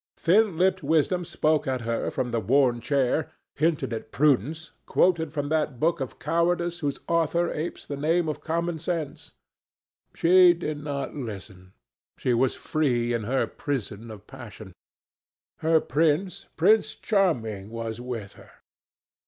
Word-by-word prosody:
Thin 195 +1 +3
lipped 185 +1 +2
wisdom 165 +3 +1
spoke 155 -3 0
at 130 -2 -1
her 115 0 -2
from 125 -1 -3
the 115 - 0
worn 125 +2 +2
chair, 140 +3 +1 0.2
hinted 150 -5 0
at 115 - -6
prudence, 150 +3 +1 0.2
quoted 165 -4 +2
from 145 -2 -3
that 150 -5 0
book 170 +3 +1
of 135 -2 -5
cowardice 170 +2 0
whose 145 -4 -2
author 170 +1 +1
apes 160 +3 -5
the 145 - -5
name 160 +4 +1
of 155 - -3
common 170 0 -2
sense. 165 -3 -4 0.8
She 180 +1 +6
did 155 -3 -5
not 140 -2 -4
listen. 95 -7 -8 0.4
She 125 - 0
was 125 +2 +2
free 120 -6 0
in 115 -3 -2
her 130 +4 +1
prison 115 -5 -5
of 105 -2 -11
passion. 110 -7 -11 0.9
Her 160 0 +3
prince, 165 +7 0
Prince 220 0 +3
Charming, 115 - 0
was 115 0 -5
with 115 -5 -6
her. - - -16
150 Hz, 145 wpm, -26 LUFS, 120-170 Hz, 0.9 s, She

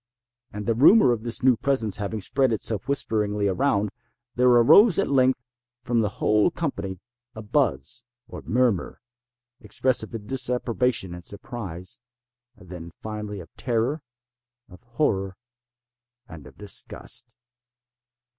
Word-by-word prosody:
And 105 0 -6
the 115 - +2
rumor 140 - +6
of 115 -3 -1
this 120 +1 -3
new 130 -1 +5
presence 115 -4 -1
having 105 +1 -4
spread 130 +5 +1
itself 110 +1 -1
whisperingly 105 -6 0
around, 100 -1 +1 0.4
there 125 +1 +3
arose 155 - +7
at - - 0
length 130 -2 +3 0.4
from 120 -2 +1
the 105 - 0
whole 105 +5 +3
company 135 - -4 0.4
a 110 - -7
buzz, 105 - 0 0.2
or - - -9
murmur, 120 -6 0 0.6
expressive 125 -4 0
of 105 -2 -7
disapprobation 125 -5 0
and 90 0 -9
surprise—then, 105 -1 -9
finally, 105 -2 -6
of 85 - -15
terror, 125 +5 -1 0.7
of 90 - -16
horror, 110 -7 -1 0.9
and 80 -4 -11
of - - -17
disgust. 105 -1 -7
115 Hz, 120 wpm, -25 LUFS, 100-125 Hz, 0.9 s, arose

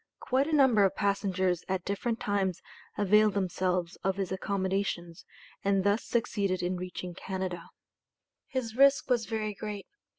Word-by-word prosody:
Quite 265 +3 +1
a - - -3
number 255 -8 +5
of 195 - +2
passengers 190 -3 0
at 185 -1 -1
different 225 +4 -2
times 195 -5 0 0.4
availed 210 +1 +4
themselves 180 -2 -1
of 190 0 -1
his 195 -2 -3
accommodations 190 -3 -2 0.4
and 195 -1 +2
thus 205 +3 +2
succeeded 200 -6 0
in 180 +1 0
reaching 180 0 -6
Canada. 185 -1 -5 0.8
His 235 -4 -3
risk 275 0 +4
was 235 -3 +2
very 215 -2 -2
great. 205 -1 -6
200 Hz, 140 wpm, -29 LUFS, 185-215 Hz, 0.8 s, number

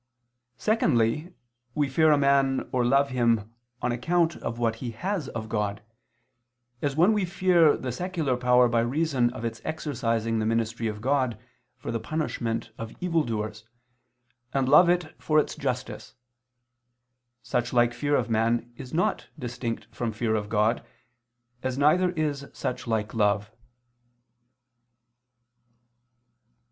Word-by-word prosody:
Secondly, 155 - +1 0.4
we 145 -2 +2
fear 155 +4 +4
a 150 - +5
man, 140 -1 +2
or 125 -1 +1
love 140 +3 +3
him 115 -3 +1 0.3
on 125 - +1
account 170 +7 +1
of 115 - -5
what 115 -1 0
he 120 +1 -5
has 175 - -3
of 110 -1 -5
God; 105 -2 -2 1.0
as 140 -2 -1
when 175 +8 +5
we 210 -2 +1
fear 175 -3 +4
the 130 - -4
secular 160 -2 -1
power 125 0 +4
by 115 0 +1
reason 130 0 +1
of 120 -1 -6
its 115 -1 -4
exercising 115 -7 -1
the 110 - 0
ministry 115 0 0
of 105 -1 -5
God 130 -3 0 0.4
for 125 - -5
the 115 - -1
punishment 115 -7 -3
of 115 0 -7
evildoers, 115 -11 -1 0.9
and 135 -1 +2
love 175 +6 +7
it 175 -3 +1
for 155 - +1
its 150 - +2
justice: 125 +1 -4 1.3
such 120 0 -1
like 120 -1 +3
fear 145 +2 0
of 120 - +1
man 115 +1 0
is 130 +3 -7
not 175 - 0
distinct 120 -3 -4
from 120 -2 -2
fear 110 +1 -1
of 105 -1 -2
God, 110 +2 +1 0.8
as 130 0 -2
neither 155 +6 +4
is 145 -4 -2
such 125 - -4
like 110 -2 -1
love. 105 -1 +1
125 Hz, 135 wpm, -26 LUFS, 115-150 Hz, 1.3 s, love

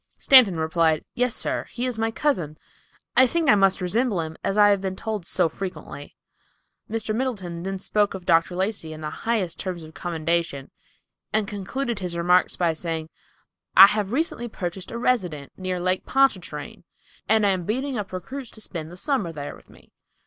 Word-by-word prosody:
Stanton 230 -11 +6
replied, 160 -1 +1
"Yes, 250 -1 0
sir; - - -1
he 245 +1 -4
is 245 -3 -3
my 225 0 +1
cousin. 200 - -1 0.6
I 260 - +7
think 330 +4 0
I - - +7
must 195 -2 +3
resemble 215 +2 0
him, 160 0 -6
as 195 - -1
I 205 0 +7
have 200 -2 +2
been 190 -1 -3
told 210 -4 -4
so 180 -3 +2
frequently." 160 -4 -7 0.7
Mr. 220 0 -2
Middleton 205 -9 -3
then 195 +2 -3
spoke 205 +1 0
of 185 -2 -8
Dr. 165 0 +3
Lacey 185 -4 -2
in 155 - -9
the 150 0 -4
highest 215 -6 -2
terms 180 -3 -4
of 155 0 -12
commendation, 165 -4 -2 0.6
and 215 -1 +1
concluded 215 +4 -3
his 180 -2 -4
remarks 180 +2 +3
by 170 -2 +1
saying, 160 -1 -4 0.7
"I 195 - +13
have 205 0 0
recently 255 -3 -1
purchased 185 -3 -5
a 235 - -5
residence, 180 - -1
near 185 -1 -3
Lake 185 +1 0
Pontchartrain, 265 -9 0 0.5
and 220 -1 +4
am 190 -3 +1
beating 260 +6 -2
up 210 -4 -4
recruits 230 +8 -6
to 220 - -9
spend 165 -5 -5
the 175 - -10
summer 255 - -1
there 145 -2 -6
with - - -20
me. - - -20
190 Hz, 180 wpm, -24 LUFS, 170-225 Hz, 0.7 s, I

